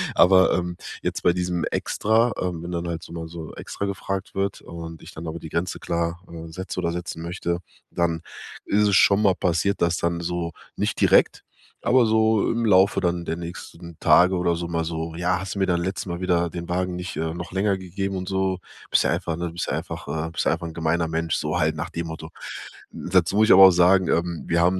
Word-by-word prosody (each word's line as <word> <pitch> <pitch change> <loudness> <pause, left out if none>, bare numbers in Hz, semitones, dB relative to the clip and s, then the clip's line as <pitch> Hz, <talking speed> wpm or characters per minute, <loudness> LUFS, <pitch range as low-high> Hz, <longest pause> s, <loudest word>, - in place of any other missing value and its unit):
Aber, 95 0 +6
ähm, 90 0 -2 0.2
jetzt - - -3
bei 90 - +4
diesem 90 -1 -1
Extra, 115 +3 +1
ähm, 90 -2 -3
wenn 85 - -6
dann 85 0 -3
halt 85 -1 -4
so - - -12
mal 80 -1 -5
so 80 -2 -8
extra 100 - -5
gefragt 95 -1 -4
wird 95 0 -1
und 80 -2 -9
ich - - -12
dann 80 +2 -7
aber 80 +1 -5
die 80 - -9
Grenze 85 +3 -2
klar, 85 0 -2
äh, 80 -1 -8
setze 95 +2 -5
oder 85 -2 0
setzen 85 -1 -5
möchte, 85 0 -3 0.3
dann 85 -1 0 0.4
ist 105 +1 +3
es 100 - +3
schon 100 +1 +5
mal 95 -3 +4
passiert, 90 +4 0
dass 85 0 +2
dann 85 0 -1
so 85 -1 -2 0.3
nicht - - -1
direkt, - - +4 0.4
aber 125 -1 +4
so 110 -1 +3
im 115 0 0
Laufe 95 -1 +4
dann 85 -1 -1
der 80 - -2
nächsten 85 -1 -9
Tage 90 +2 +5
oder 85 -1 +1
so, 85 0 -4
mal 85 -1 -1
so: 80 0 -4
„Ja, 90 +1 0
hast 95 +1 -5
du - - -3
mir 95 - +2
dann 85 -1 +1
letztes 95 +2 -3
Mal 85 -1 -4
wieder 85 -2 +1
den 85 +1 -6
Wagen 90 0 -1
nicht, 90 +1 -5
äh, 80 0 -2
noch 85 +1 -7
länger 95 +1 +1
gegeben 95 +1 -4
und 90 0 -5
so. 95 -1 0 0.3
Bist - - +4
ja - - +1
einfach, 85 - -1
ne 85 -1 -3
bist 85 +1 -4
du - - -2
einfach, - - -5
äh 80 +3 -3
bist 85 - -2
du - - +4
einfach 85 +1 -1
'n 80 - -8
gemeiner 80 +1 0
Mensch, 80 0 -1
so 75 0 -1
halt 80 0 +1
nach 85 +2 -4
dem 85 0 -4
Motto.“ 80 -1 -7 0.6
Dazu 90 0 +1
muss 110 - +5
ich - - +8
aber 95 - +9
auch - - +6
sagen, 90 +1 +4
ähm, 85 -1 0
wir 85 0 +2
haben 90 +2 +3
85 Hz, 230 wpm, -24 LUFS, 85-95 Hz, 0.6 s, aber